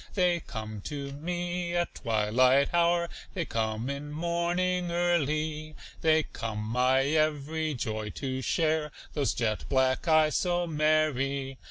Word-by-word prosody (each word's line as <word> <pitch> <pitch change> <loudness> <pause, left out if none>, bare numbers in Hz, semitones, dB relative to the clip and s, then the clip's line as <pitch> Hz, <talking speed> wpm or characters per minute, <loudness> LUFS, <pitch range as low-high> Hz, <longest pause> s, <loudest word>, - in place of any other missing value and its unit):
They 180 -3 +3
come 110 -7 -7
to 140 -2 -5
me 175 +3 -3
at 175 0 0
twilight 125 +5 +2
hour, 170 0 +3 0.3
They 170 -3 -1
come 110 0 -2
in 140 +1 -4
morning 175 +2 0
early, 155 -3 0 0.3
They 160 -1 +4
come 110 -6 -5
my 125 +5 +2
every 155 +1 0
joy 110 -2 -3
to 130 -2 -3
share, 155 +2 +1 0.2
Those 145 -3 0
jet 110 -3 -1
black 130 +4 +2
eyes 155 -2 +4
so 175 -1 +1
merry. 150 -4 +1
150 Hz, 130 wpm, -29 LUFS, 130-170 Hz, 0.3 s, They